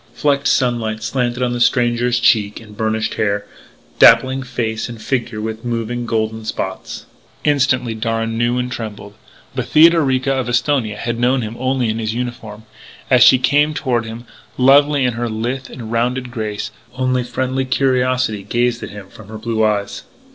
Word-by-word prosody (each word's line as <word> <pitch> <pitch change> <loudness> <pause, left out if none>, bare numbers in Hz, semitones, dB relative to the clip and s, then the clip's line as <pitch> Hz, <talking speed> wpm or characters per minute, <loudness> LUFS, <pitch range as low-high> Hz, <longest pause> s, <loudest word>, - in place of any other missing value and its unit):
Flecked 145 -1 +1
sunlight 115 -4 0
slanted 125 +1 -1
on 120 -1 0
the 120 - -3
stranger's 120 0 +2
cheek 105 -4 +2
and 105 -2 -14
burnished 110 0 -1
hair, 100 -1 0 0.5
dappling 130 +1 +6
face 120 -4 -3
and 115 -2 -8
figure 120 -2 -2
with 110 +1 -5
moving, 120 0 -3
golden 110 0 -2
spots. 110 - -5 0.4
Instantly 130 -5 +1
Darragh 115 0 -2
knew 120 +2 0
and 125 0 -2
trembled. 105 -3 -7 0.4
But - - -3
Theodorica 150 -5 +4
of 130 -2 -1
Esthonia 120 -3 0
had 120 +2 -3
known 125 +1 +2
him 110 +1 -6
only 130 -1 0
in 110 +1 -2
his 110 0 -2
uniform. 120 -3 -6 0.5
As - - +5
she 130 - +7
came 145 +4 +2
toward 125 -6 -1
him, 115 +2 -8 0.3
lovely 140 +1 +4
in 125 - +1
her 120 0 -3
lithe 120 +4 -3
and 115 -3 -8
rounded 125 +2 -1
grace, 110 -2 -4 0.2
only 130 -1 0
friendly 130 +2 -2
curiosity 130 -4 +1
gazed 120 +4 -1
at - - -6
him 100 -2 -10
from 105 0 -14
her 110 +1 -8
blue 110 0 -1
eyes. 105 -2 -1
120 Hz, 165 wpm, -18 LUFS, 110-130 Hz, 0.5 s, she